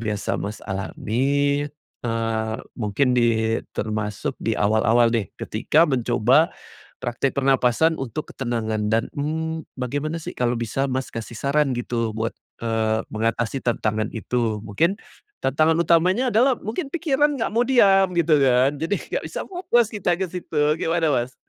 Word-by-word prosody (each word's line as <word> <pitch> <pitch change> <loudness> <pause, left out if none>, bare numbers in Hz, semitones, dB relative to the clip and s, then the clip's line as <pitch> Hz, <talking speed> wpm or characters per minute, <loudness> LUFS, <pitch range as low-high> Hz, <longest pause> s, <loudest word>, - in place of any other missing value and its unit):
biasa 105 -2 -2
Mas 105 +1 -5
alami, 140 +9 0 0.4
eee, 115 -1 -1 0.2
mungkin 120 +4 +1
di 115 -2 +2 0.2
termasuk 105 -1 -3
di - - -1
awal-awal 110 +3 +3
nih 110 -5 -1
ketika 160 +2 +2
mencoba 125 +3 +3 0.5
praktek 120 +3 -2
pernapasan 135 +4 +3
untuk 135 +4 -5
ketenangan 110 -4 -2
dan, 115 +1 +3
mmm, 160 +2 -2 0.2
bagaimana 145 +5 -2
sih - - -6
kalau 125 0 +1
bisa, 120 +4 -1
Mas, 130 0 -2
kasih 115 0 -6
saran 140 -1 +1
gitu 115 -2 -2
buat, 115 +1 -1 0.3
eee, 110 -1 0
mengatasi 115 +3 -1
tantangan 110 -2 0
itu, 115 -2 -1
mungkin 165 - +1 0.5
tantangan 155 +4 +3
utamanya 180 +9 +3
adalah 250 +4 +4
mungkin 235 - -4
pikiran 295 -3 +1
nggak 225 - -1
mau 235 - +4
diam 195 -7 +5
gitu 160 -3 +4
kan, 130 +1 +4
jadi 165 +6 0
nggak - - -4
bisa - - -5
fokus 295 - +1
kita 200 -5 0
ke - - +2
situ, 170 -3 -3 0.2
gimana, 165 0 +1
Mas? 125 -1 -1
130 Hz, 140 wpm, -23 LUFS, 115-160 Hz, 0.5 s, diam